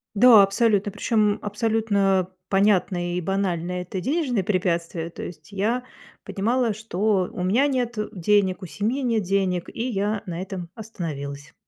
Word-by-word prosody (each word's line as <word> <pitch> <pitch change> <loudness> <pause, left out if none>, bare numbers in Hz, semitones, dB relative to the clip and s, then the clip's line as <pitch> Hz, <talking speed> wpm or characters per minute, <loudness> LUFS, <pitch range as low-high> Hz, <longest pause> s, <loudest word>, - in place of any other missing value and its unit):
Да, 220 -1 +8
абсолютно, 205 0 +2
причём 210 -3 +1
абсолютно 205 -3 +1 0.2
понятное 190 -3 +2
и - - 0
банальное- 180 -1 -1
это 180 +1 -6
денежные 260 - 0
препятствия, 170 -3 -1
то 170 - -9
есть 155 0 -9
я 225 +6 0 0.4
понимала, 230 +2 0
что 205 -3 0
у 180 - -4
меня 230 +10 +3
нет 245 -4 -1 0.2
денег, 195 0 +2
у 185 - -5
семьи 220 - -2
нет 230 -3 +1
денег, 185 -2 0
и 240 +3 -2
я 205 -1 -1
на 175 -1 -4
этом 185 -3 -6
остановилась. 145 -10 -6
200 Hz, 145 wpm, -24 LUFS, 180-220 Hz, 0.4 s, Да